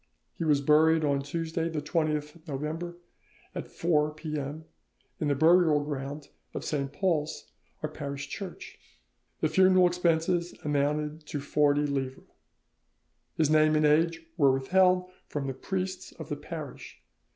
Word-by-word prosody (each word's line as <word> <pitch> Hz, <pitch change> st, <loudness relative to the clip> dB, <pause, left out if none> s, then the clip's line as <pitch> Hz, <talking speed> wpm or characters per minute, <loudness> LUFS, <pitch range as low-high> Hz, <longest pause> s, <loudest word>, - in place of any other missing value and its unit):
He -, -, -4 dB
was 150 Hz, -3 st, +3 dB
buried 155 Hz, +2 st, +4 dB
on 140 Hz, -1 st, +1 dB
Tuesday 165 Hz, +3 st, -2 dB
the 160 Hz, -2 st, -2 dB
20th 155 Hz, +1 st, -2 dB
November 160 Hz, +5 st, -4 dB, 0.6 s
at -, -, -5 dB
4 150 Hz, -3 st, +1 dB
P.M. 155 Hz, -1 st, -5 dB, 0.5 s
in 155 Hz, -, 0 dB
the 145 Hz, -, +2 dB
burial 160 Hz, 0 st, +5 dB
ground 145 Hz, 0 st, -5 dB, 0.3 s
of -, -, -4 dB
St. 140 Hz, -2 st, -2 dB
Paul's, 160 Hz, -1 st, -1 dB, 0.3 s
our 155 Hz, -, -1 dB
parish 140 Hz, -2 st, -5 dB
church. 195 Hz, -3 st, -8 dB, 0.6 s
The -, -, +3 dB
funeral 185 Hz, -1 st, +5 dB
expenses 175 Hz, 0 st, +1 dB
amounted 150 Hz, +1 st, -1 dB
to 145 Hz, -, -3 dB
40 145 Hz, +1 st, +2 dB
livres." 135 Hz, -2 st, -3 dB, 1.1 s
His 155 Hz, -2 st, +3 dB
name 155 Hz, 0 st, +5 dB
and 155 Hz, 0 st, +3 dB
age 165 Hz, +2 st, +2 dB
were 140 Hz, -4 st, +5 dB
withheld 180 Hz, +7 st, +3 dB, 0.2 s
from 145 Hz, -2 st, -3 dB
the 135 Hz, -, -2 dB
priests 185 Hz, +4 st, -4 dB
of -, -, -9 dB
the -, -, -1 dB
parish. -, -, -8 dB
155 Hz, 140 wpm, -28 LUFS, 145-170 Hz, 1.1 s, burial